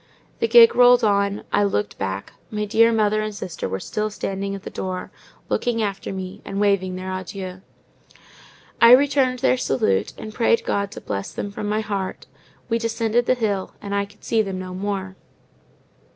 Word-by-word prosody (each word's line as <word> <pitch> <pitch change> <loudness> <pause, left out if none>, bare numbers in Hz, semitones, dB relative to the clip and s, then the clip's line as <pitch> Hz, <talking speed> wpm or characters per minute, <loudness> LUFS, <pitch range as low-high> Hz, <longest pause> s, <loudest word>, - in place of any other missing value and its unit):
The 230 - +1
gig 230 0 +7
rolled 245 0 +6
on; 200 -1 +1
I 205 - +4
looked 195 - -1
back; 95 0 -4 0.2
my 210 -1 -2
dear 230 +2 +4
mother 215 -1 +2
and 215 -1 -4
sister 175 - -5
were 95 +1 -3
still 215 - -2
standing 195 -1 -4
at 195 - -9
the - - -7
door, 185 -1 -5 0.4
looking 230 -2 0
after 200 -1 -3
me, 190 +1 -6
and 195 0 -4
waving 200 -3 +1
their 185 +1 -5
adieux. 185 0 -6 1.2
I 235 +1 +9
returned 265 -1 +4
their 255 - +4
salute, 105 - 0
and 215 0 -8
prayed 230 0 +2
God 200 0 0
to - - -8
bless 100 -1 -4
them 205 - -5
from 205 +1 -4
my 215 +1 0
heart: 200 -3 -4 0.4
we 230 -1 0
descended 230 +1 0
the 255 - +4
hill, 205 -5 -2
and 200 -1 -6
I 200 0 +1
could 205 +1 -21
see 225 -1 +2
them 195 -3 -3
no 185 0 -6
more. 190 0 -4
205 Hz, 180 wpm, -22 LUFS, 190-225 Hz, 1.2 s, I